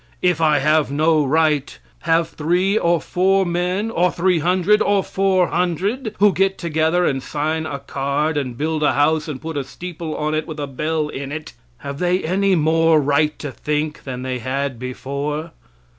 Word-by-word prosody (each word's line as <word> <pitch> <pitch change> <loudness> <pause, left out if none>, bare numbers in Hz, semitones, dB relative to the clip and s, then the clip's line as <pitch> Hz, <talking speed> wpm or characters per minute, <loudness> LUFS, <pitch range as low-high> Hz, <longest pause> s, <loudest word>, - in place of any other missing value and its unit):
If 180 -3 +2
I 155 -2 +4
have 150 +1 +2
no 155 +2 +2
right, 150 0 +1 0.2
have 165 0 +1
three 180 +6 0
or 170 -5 +2
four 190 +3 +1
men 180 +5 -1
or 180 -3 +2
300 180 +3 +2
or 200 -1 +2
400, 190 - 0
who 205 -1 +4
get 195 +2 +1
together 165 +1 +1
and 135 -1 0
sign 155 +3 -2
a 140 - -4
card 140 +3 -2
and 130 -5 -3
build 155 +2 -1
a 150 - +3
house 155 +2 +2
and 145 -4 -5
put 160 -1 -5
a 140 - -1
steeple 170 +2 -7
on 155 0 -1
it 155 0 -1
with 155 -2 -7
a 145 - -2
bell 150 +3 -2
in 140 -1 -6
it 155 0 -6 0.2
have 140 0 -7
they 180 +1 +1
any 190 +3 +2
more 165 0 +3
right 150 +2 +1
to 145 - -6
think 150 +3 -3
than 125 -2 -6
they 130 -1 -3
had 130 0 -3
before? 140 +5 -4
155 Hz, 175 wpm, -20 LUFS, 145-180 Hz, 0.2 s, I